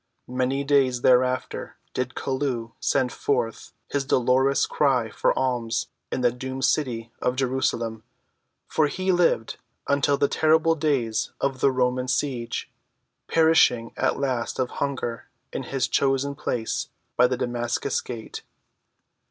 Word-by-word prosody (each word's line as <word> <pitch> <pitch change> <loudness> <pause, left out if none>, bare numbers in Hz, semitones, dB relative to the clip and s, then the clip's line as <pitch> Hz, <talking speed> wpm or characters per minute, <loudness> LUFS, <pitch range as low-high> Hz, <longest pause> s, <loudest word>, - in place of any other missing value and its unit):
Many 130 +2 0
days 135 -3 +2
thereafter 130 0 +2 0.2
did 130 0 -3
Chelluh 130 -4 -2
send 130 -2 +1
forth 120 -5 -2 0.2
his 140 -1 0
dolorous 130 +1 +3
cry 130 -6 +1
for - - +2
alms 120 -3 -1 0.2
in - - -1
the 120 -1 +4
doomed 130 +2 -3
city 120 -6 0
of 125 - +1
Jerusalem, 125 -4 -1 0.7
for 155 -2 +2
he 185 +6 -1
lived 175 -10 +2 0.3
until 140 0 +2
the 140 - +3
terrible 160 +2 +3
days 135 -8 0
of 135 -1 -1
the 135 - +4
Roman 125 0 0
siege, 125 -3 -2 0.6
perishing 160 -8 +4
at - - +1
last 130 -4 -1
of 130 -1 -1
hunger 130 -4 -3 0.2
in - - -2
his 135 -2 -1
chosen 135 +1 +1
place 120 -4 -2 0.3
by 125 - +5
the 125 0 -1
Damascus 120 +2 -1
gate. 115 -3 -7
130 Hz, 130 wpm, -25 LUFS, 120-140 Hz, 0.7 s, by